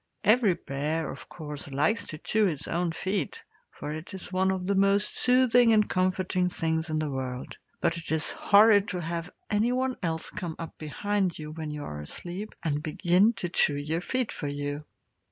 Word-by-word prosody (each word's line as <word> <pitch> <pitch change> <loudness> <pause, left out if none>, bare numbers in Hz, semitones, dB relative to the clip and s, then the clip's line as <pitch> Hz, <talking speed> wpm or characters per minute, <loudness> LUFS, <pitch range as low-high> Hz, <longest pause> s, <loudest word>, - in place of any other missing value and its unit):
Every 215 -3 +5
bear, 150 +3 -2
of - - -10
course, 150 -3 -7
likes 150 +12 +1
to 155 - -6
chew 215 +7 +2
his 155 -5 -1
own 170 0 0
feet, 190 +4 -2 0.3
for 150 - -6
it 155 +1 -7
is 185 0 -7
one 190 +1 +2
of 190 -1 -1
the 200 - +1
most 200 +1 +3
soothing 245 -2 +5
and 210 -1 +4
comforting 185 0 +1
things 160 -1 -1
in 155 - 0
the 155 -2 -1
world; 130 -1 -5 0.2
but - - +2
it 165 - -7
is 160 0 +1
horrid 205 0 +5
to 180 - -2
have 170 +1 -3 0.2
anyone 250 +5 +1
else 160 -2 -2
come 170 -3 -5
up 165 - -7
behind 190 +4 -1
you, 150 -1 -7
when 155 -1 -5
you 150 -1 -5
are 75 - -6
asleep, 180 - -6
and 150 -2 0
begin 175 +7 +3
to 180 -4 -3
chew 145 -3 +3
your 155 +4 -2
feet 255 +4 -1
for 145 - -4
you. 145 +1 -4
175 Hz, 190 wpm, -28 LUFS, 155-205 Hz, 0.3 s, Every